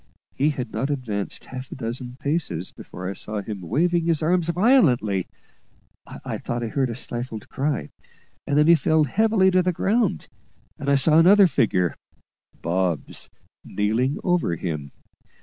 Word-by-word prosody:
He 145 +3 +1
had 130 -4 -4
not 130 +6 -2
advanced 115 -8 -3
half 130 0 -8
a - - -6
dozen 125 +1 -5
paces 140 - -1
before 90 0 -9
I 95 - -3
saw 105 0 -5
him 105 -3 -6
waving 165 - +1
his 165 -2 +1
arms 170 +1 +1
violently; 155 - +3 0.8
I - - -6
thought 120 0 -3
I 115 - -3
heard 135 +1 0
a 115 - -4
stifled 120 -2 -5
cry, 135 - -2 0.6
and 145 - +1
then 150 - +5
he 170 - +7
fell 155 0 +3
heavily 195 - +3
to 185 0 +4
the 180 0 +1
ground; 210 +4 0 0.5
and 140 - -3
I 140 - +5
saw 155 +4 +4
another 195 +4 +7
figure 105 - +1 0.7
Bob's 90 -2 -1 0.3
kneeling 110 +7 0
over 175 - +1
him. 75 -4 -4
135 Hz, 155 wpm, -23 LUFS, 105-170 Hz, 0.8 s, he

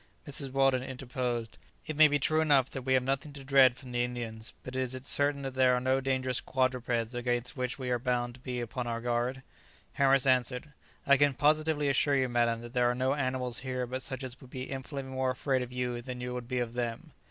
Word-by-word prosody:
Mrs. 140 -1 -2
Weldon 135 -1 +3
interposed, 125 -3 -4 0.3
"It 155 - -4
may 155 +1 +8
be 145 0 +2
true 155 +3 +2
enough 140 -5 +3
that 135 - -5
we 130 +1 +2
have 130 - +2
nothing 135 +3 -2
to 140 -1 -9
dread 130 -2 +5
from 130 -2 -10
the 120 0 +1
Indians, 120 -2 -5
but 130 - -7
is 130 -1 -1
it 130 +1 -8
certain 145 0 +3
that 135 -1 -4
there 130 -1 +4
are - - +1
no 130 +1 +1
dangerous 130 -1 0
quadrupeds 125 -3 0
against 120 +1 -1
which 125 -2 -2
we 130 -2 -3
are 120 - +1
bound 120 -1 -1
to 130 - -15
be 125 -1 -4
upon 120 +1 -4
our 115 0 -2
guard?" 120 +2 -1 0.5
Harris 135 -1 +4
answered, 130 +2 +1 0.3
"I 140 0 +6
can 145 -1 +3
positively 155 0 +2
assure 140 +1 +3
you, 130 -2 +1
madam, 120 -1 +1
that 120 0 -10
there 125 -1 +3
are 125 - 0
no 130 +2 +1
animals 130 -3 -1
here 130 -1 -3
but 130 +2 -4
such 130 0 -4
as 130 +1 -7
would 130 - -13
be 130 0 -5
infinitely 135 0 -5
more 130 0 0
afraid 130 +1 0
of 125 0 -5
you 125 -1 -2
than 125 0 -6
you 125 0 -4
would 125 -1 -5
be 130 0 -2
of 120 -2 -2
them." 120 -2 -4
130 Hz, 230 wpm, -30 LUFS, 125-135 Hz, 0.5 s, may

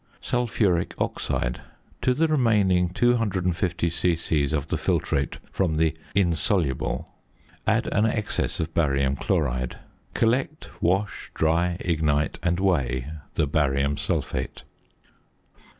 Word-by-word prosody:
~Sulphuric 105 -8 0
Oxide.~ - - -2 0.4
To 125 - +2
the 165 +3 +3
remaining 105 - +3
250 90 -6 +1
c.c. 80 -2 +1
of 75 +1 -2
the - - 0
filtrate 70 0 0
from 85 -5 0
the 80 0 +2 0.2
"insoluble," 85 - 0 0.6
add - - +2
an 105 +2 +3
excess 110 -1 -1
of 80 +1 -2
barium 70 -4 +2
chloride. 65 -2 -1 0.4
Collect, 130 +7 0
wash, 95 +4 0
dry, 85 +2 +2
ignite, 75 -3 0
and 85 0 +1
weigh 70 -8 0 0.2
the - - +2
barium 70 -1 +1
sulphate. 65 -2 -2
85 Hz, 105 wpm, -25 LUFS, 75-100 Hz, 0.6 s, the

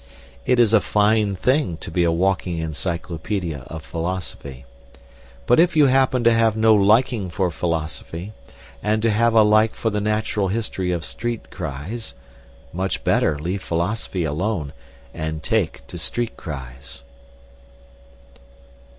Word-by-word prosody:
It 125 - +4
is 115 -2 +4
a 110 - +6
fine 105 -1 +2
thing 125 - +1
to - - -8
be 90 +1 +2
a 85 - +3
walking 90 0 0
encyclopaedia 85 +1 -3
of 80 0 -7
philosophy, 85 -7 -5 0.8
but 120 - +4
if 170 0 +4
you 150 -2 +6
happen 130 -2 +3
to 115 0 +5
have 115 -1 +3
no 110 0 +5
liking 105 0 +3
for 90 0 0
philosophy, 85 +3 -4 0.5
and 110 +1 0
to 115 - +3
have 115 +2 +2
a 110 - +8
like 110 +1 +4
for 115 - -1
the 105 0 -1
natural 105 -1 0
history 95 -3 -2
of 85 -3 -2
street 120 -1 -4
cries, 90 - -5 0.6
much 95 +2 -2
better 75 - +2
leave 90 +6 -3
philosophy 90 +2 -2
alone, 80 0 -2 0.4
and 80 -1 -4
take 110 -6 -1
to - - -8
street 120 -1 -2
cries. 65 -4 -8
95 Hz, 140 wpm, -22 LUFS, 85-110 Hz, 0.8 s, a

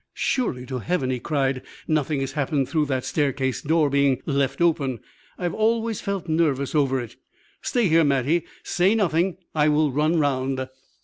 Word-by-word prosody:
"Surely 130 - -1
to 130 -1 -4
Heaven," 150 -2 -1
he 125 - -2
cried, 135 -2 -1 0.3
"nothing 155 -2 0
has 135 -1 -2
happened 140 -1 0
through 155 -3 0
that 130 -2 -1
staircase 135 -3 -1
door 160 0 +2
being 140 -2 +2
left 140 -2 0
open? 145 -8 +1 0.4
I 180 - -2
always 225 +2 0
felt 200 -3 -3
nervous 155 -4 +1
over 135 -3 +2
it. 120 -3 -8 0.4
Stay 240 -5 +1
here, 165 0 +4
Mattie; 145 +4 +1 0.2
say 190 +5 +2
nothing. 180 -3 +1 0.2
I 150 -1 +3
will 150 -1 +2
run 155 +5 +1
round." 130 -3 0
150 Hz, 165 wpm, -24 LUFS, 135-165 Hz, 0.4 s, here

